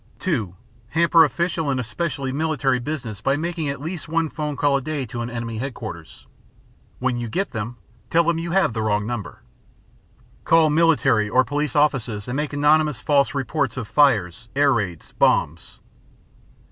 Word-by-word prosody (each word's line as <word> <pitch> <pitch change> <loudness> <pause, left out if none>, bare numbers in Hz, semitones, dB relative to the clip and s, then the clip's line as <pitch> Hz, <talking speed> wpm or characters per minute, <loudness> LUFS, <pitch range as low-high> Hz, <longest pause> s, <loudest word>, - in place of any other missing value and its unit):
(2) 115 - -2 0.3
Hamper 165 +3 +5
official 160 +1 -1
and 135 -2 0
especially 135 +2 -3
military 145 -3 0
business 120 -6 -5
by 135 +1 +1
making 165 -1 -2
at 140 - -4
least 160 +4 -6
one 165 0 0
telephone 150 -1 -3
call 145 0 +2
a 135 - +1
day 150 -1 -3
to 120 +1 -6
an 120 - -4
enemy 115 -2 -5
headquarters; 110 - -7 0.7
when 125 -1 -1
you 120 -1 -3
get 195 - -2
them, 115 +2 -5 0.3
tell 170 0 +4
them 170 0 +1
you 170 +1 -4
have 185 -8 +2
the 110 - -2
wrong 105 -1 0
number. 115 -3 -6 1.0
Call 165 -2 +4
military 135 -9 +3
or 130 +4 +4
police 145 +2 -2
offices 125 -8 +1
and 125 - -3
make 150 +1 -2
anonymous 150 -1 +2
false 140 +1 +2
reports 140 -1 -1
of 120 -5 -4
fires, 115 - +2
air 140 -1 +4
raids, 95 -8 -3
bombs. 80 +3 +1
140 Hz, 165 wpm, -22 LUFS, 115-155 Hz, 1.0 s, Hamper